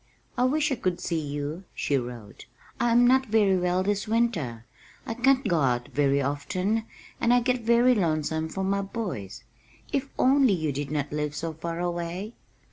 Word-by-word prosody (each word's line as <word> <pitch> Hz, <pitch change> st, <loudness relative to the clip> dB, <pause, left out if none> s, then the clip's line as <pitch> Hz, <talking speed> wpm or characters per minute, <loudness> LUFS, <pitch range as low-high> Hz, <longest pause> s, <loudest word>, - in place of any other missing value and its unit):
"I 250 Hz, -, +2 dB
wish 300 Hz, +3 st, +1 dB
I -, -, +2 dB
could 180 Hz, -4 st, -1 dB
see 165 Hz, -, -1 dB
you," 145 Hz, +3 st, -4 dB
she 145 Hz, -, 0 dB
wrote. 120 Hz, -6 st, -6 dB, 0.3 s
"I 240 Hz, -, +2 dB
am 240 Hz, +1 st, +5 dB
not 260 Hz, +1 st, +4 dB
very 210 Hz, -3 st, +3 dB
well 180 Hz, 0 st, +1 dB
this 205 Hz, +1 st, -1 dB
winter, 175 Hz, -, 0 dB, 0.4 s
I -, -, -3 dB
can't 265 Hz, +3 st, +2 dB
go 170 Hz, -2 st, +2 dB
out 120 Hz, -2 st, 0 dB
very 140 Hz, -1 st, +2 dB
often 180 Hz, +10 st, -1 dB, 0.3 s
and 235 Hz, -, +2 dB
I 245 Hz, -, +6 dB
get 250 Hz, 0 st, 0 dB
very 235 Hz, +2 st, +4 dB
lonesome 160 Hz, -5 st, 0 dB
for 190 Hz, +4 st, -3 dB
my 200 Hz, +1 st, +1 dB
boys. 180 Hz, -, -5 dB, 0.5 s
If 275 Hz, -1 st, -1 dB
only 265 Hz, -3 st, +4 dB
you 160 Hz, -5 st, -1 dB
did 140 Hz, 0 st, -4 dB
not 145 Hz, -1 st, -2 dB
live 150 Hz, 0 st, -2 dB
so 165 Hz, +1 st, -3 dB
far 165 Hz, +2 st, -5 dB
away!" 175 Hz, +4 st, -3 dB
180 Hz, 180 wpm, -26 LUFS, 145-235 Hz, 0.5 s, I